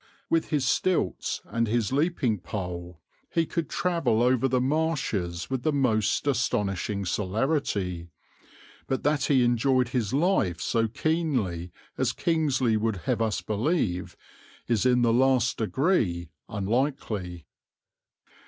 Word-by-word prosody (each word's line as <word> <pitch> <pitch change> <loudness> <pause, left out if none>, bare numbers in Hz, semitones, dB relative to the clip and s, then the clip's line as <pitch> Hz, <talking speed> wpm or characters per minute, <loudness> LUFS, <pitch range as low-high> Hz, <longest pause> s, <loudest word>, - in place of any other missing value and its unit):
With 165 -1 +2
his 145 -4 +1
stilts 145 - 0
and 115 0 -1
his 110 -1 0
leaping 135 - +1
pole 90 -2 -6 0.3
he 165 -1 +1
could 165 -1 -3
travel 140 -11 +1
over 130 +1 +3
the 130 -1 +1
marshes 130 - -1
with 130 -2 -1
the 155 - +1
most 125 -7 +1
astonishing 105 -7 0
celerity; 95 - -1 0.8
but 135 - -1
that 145 -1 +2
he 135 -4 +4
enjoyed 125 +1 +2
his 120 -6 -1
life 140 - +1
so 115 +4 +1
keenly 120 - -1 0.3
as - - +1
Kingsley 140 -9 +1
would 110 0 0
have 120 -3 0
us 110 -5 0
believe 105 - -1 0.5
is 120 +1 +2
in 125 -1 +3
the 115 -1 +3
last 125 -1 +3
degree 110 - +1 0.2
unlikely. 105 - -2
120 Hz, 125 wpm, -27 LUFS, 100-140 Hz, 0.8 s, he